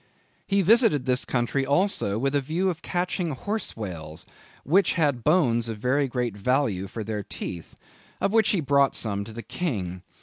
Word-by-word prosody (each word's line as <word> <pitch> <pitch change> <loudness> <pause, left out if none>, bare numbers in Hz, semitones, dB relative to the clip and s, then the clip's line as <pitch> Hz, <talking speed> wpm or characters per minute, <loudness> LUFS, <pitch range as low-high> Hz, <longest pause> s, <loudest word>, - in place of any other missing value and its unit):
"He 195 0 +2
visited 210 - +4
this 125 -1 +1
country 125 +2 0
also 140 - +1
with 135 +4 0
a 145 - +2
view 170 +7 0
of 165 -1 -9
catching 175 -2 -2
horse 210 - -3
whales, 80 -7 -7 0.4
which 180 +6 +3
had 145 -8 +1
bones 125 -8 +2
of 110 - -4
very 130 +5 +1
great 125 -4 -2
value 105 -3 0
for 110 +3 -6
their 105 0 -3
teeth, 85 -3 -7 0.4
of 200 - 0
which 220 -1 +4
he 190 - +2
brought 140 -1 +3
some 100 -3 -1
to 110 - -9
the 115 +1 -7
king.... 95 - -3
135 Hz, 175 wpm, -25 LUFS, 110-175 Hz, 0.4 s, visited